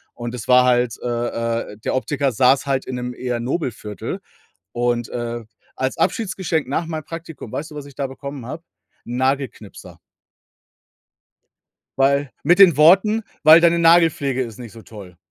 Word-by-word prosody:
Und 120 0 -6
es 110 - -8
war 125 0 +6
halt, 120 -2 +1
äh, 115 -2 -2
äh - - -14
der 110 - -2
Optiker 135 0 -1
saß 130 +5 +3
halt 135 -1 -1
in 130 - -5
'nem 125 0 -4
eher 125 -1 -3
Nobelviertel. 120 - -4 0.5
Und, 120 -1 -1
äh, 120 -1 -5 0.3
als 130 0 -2
Abschiedsgeschenk 185 - -1
nach 165 +4 -1
meinem 155 -2 -5
Praktikum, 165 -8 -9
weißt 155 +2 -5
du, - - -10
was 145 -1 -7
ich 140 - -15
da 140 -2 -2
bekommen 140 -1 -8
habe? 160 +6 -7 0.4
'N 120 +1 -5
Nagelknipser. 130 -5 -3 2.0
Weil 140 0 +2
mit 175 +6 +3
den 175 -7 +7
Worten: 195 +8 +5 0.2
„Weil 160 +2 +8
deine 170 0 +4
Nagelpflege 165 -6 +3
ist 115 -1 -10
nicht 115 -4 -9
so 115 - -13
toll.“ 95 -6 -13
130 Hz, 160 wpm, -20 LUFS, 120-155 Hz, 2.0 s, Weil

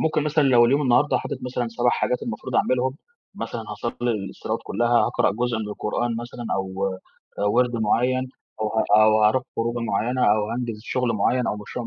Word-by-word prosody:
ممكن 155 -1 +1
مثلًا 150 +1 +2
لو 125 -3 +6
اليوم 140 +5 +3
النهارده 130 +2 +3
حاطط - - -5
مثلًا 125 -1 -2
7 120 +1 +1
حاجات 125 - -1
المفروض 115 +3 -5
أعملهم، 130 +1 +1 0.4
مثلًا - - -5
هاصلي 120 0 -3 0.2
الصلوات - - -4
كلها، 120 +3 +2
هقرأ 120 - +2
جزء 120 +2 -1
من 105 -1 -4
القرآن 110 +3 -2
مثلًا 120 0 -7
أو 95 0 -3 0.6
آآ، - - +1
وِرد 120 +4 +2
معيّن 125 +4 +1 0.4
أو 110 - 0
ه - - +3 0.2
أو 110 0 +4
هاروح 115 +4 +3
خروجة 115 +1 -1
معيّنة 120 +3 -1
أو 105 +1 +2
هانجز 115 -2 -3
شغل 125 0 -1
معيّن 125 +4 +1
أو 105 - -1
مشروع 115 +3 -6
120 Hz, 180 wpm, -23 LUFS, 110-125 Hz, 0.6 s, لو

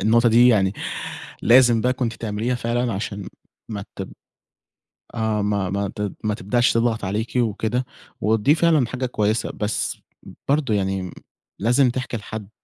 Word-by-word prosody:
النقطة 115 +4 +4
دي 120 +2 +6
يعني 95 -5 +3 0.7
لازم 120 -1 +6
بقى 125 +2 +2
كُنتِ 125 -3 -2
تعمليها 110 +3 -2
فعلًا 120 0 -1
عشان 100 -1 -4 0.4
ما 100 -3 -5
تـب - - -6 1.0
آه 110 -2 0
ما 100 -2 0
ما 100 +2 -1
ما 100 - 0
تد 105 -1 -3
ما 105 - 0
تبدأش 120 +5 +1
تضغط 115 -2 +1
عليكِ 105 +6 -3
وكده، 120 +1 0 0.4
ودي 110 +7 +3
فعلًا 160 -7 +3
حاجة 130 +1 -3
كويسة 110 -2 0
بس 105 +1 -2 0.5
برضه 140 -6 +2
يعني 95 -2 -1 0.5
لازم 125 +5 +3
تحكي 125 -1 -3
لحد 105 -1 -7
110 Hz, 145 wpm, -22 LUFS, 105-125 Hz, 1.0 s, دي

